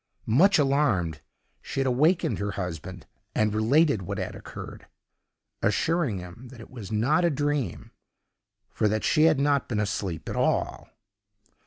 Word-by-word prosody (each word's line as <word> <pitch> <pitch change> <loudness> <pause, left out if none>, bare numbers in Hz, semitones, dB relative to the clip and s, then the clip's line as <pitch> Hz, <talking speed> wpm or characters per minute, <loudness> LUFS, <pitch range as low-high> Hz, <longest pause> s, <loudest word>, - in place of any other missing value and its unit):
Much 175 - +4
alarmed, 125 - +1 0.4
she - - -5
had 135 - +1
awakened 150 +8 +2
her 100 0 -2
husband 90 -5 -6 0.3
and 105 -1 +2
related 135 - +3
what 100 +2 -5
had 95 - -4
occurred, - - -10 0.7
assuring 125 - +1
him 90 +8 -10
that 125 -1 -13
it 115 - -12
was 110 -6 -9
not 125 +11 +2
a 170 - +4
dream, 145 - -2 0.8
for 110 - +1
that 110 +1 -1
she 155 -1 +4
had 155 -4 +4
not 140 -1 +1
been 110 -4 -1
asleep 95 -6 -3
at - - -4
all. - - -1
115 Hz, 150 wpm, -26 LUFS, 100-145 Hz, 0.8 s, Much